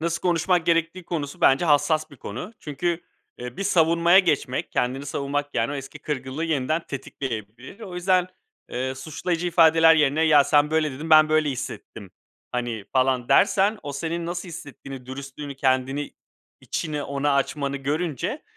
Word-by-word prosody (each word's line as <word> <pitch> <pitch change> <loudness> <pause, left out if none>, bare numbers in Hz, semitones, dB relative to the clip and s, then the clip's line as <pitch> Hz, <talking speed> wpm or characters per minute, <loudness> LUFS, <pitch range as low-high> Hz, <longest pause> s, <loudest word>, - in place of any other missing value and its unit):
nasıl 170 +1 -1
konuşmak 175 -1 +1
gerektiği 170 +1 +1
konusu 150 -5 -4
bence 135 +6 +4
hassas 155 0 +2
bir 140 - -14
konu. 120 - -7
Çünkü, 170 +3 -2 0.4
eee, 125 0 -7
bir - - -3
savunmaya 170 +1 +4
geçmek, 150 -8 0
kendini 130 +3 -1
savunmak, 145 +1 -3
yani, 145 - 0
o - - -3
eski 135 +2 -7
kırgınlığı 140 +2 -4
yeniden 155 +1 0
tetikleyebilir. 130 - -6
O 190 -5 -8
yüzden, 180 0 +2 0.4
eee, 130 +1 -2
suçlayıcı 165 +5 -3
ifadeler 165 -1 +6
yerine 150 0 +2
"Ya 150 -3 +6
sen 150 0 +3
böyle 160 -1 +1
dedin, 155 +5 -7
ben 155 0 +7
böyle 155 -1 +2
hissettim." 115 -6 -7 0.4
hani, 120 -4 -3
falan 130 -2 +1
dersen, 205 +2 +4
o 145 -1 -5
senin 165 +4 -3
nasıl 175 +1 -4
hissettiğini, 140 -5 -9
dürüstlüğünü, 140 +2 -7
kendini 135 +2 0 0.5
içini 150 -3 -3
ona 140 0 0
açmanı 140 0 -1
görünce, 150 - -2
150 Hz, 150 wpm, -24 LUFS, 135-165 Hz, 0.5 s, ben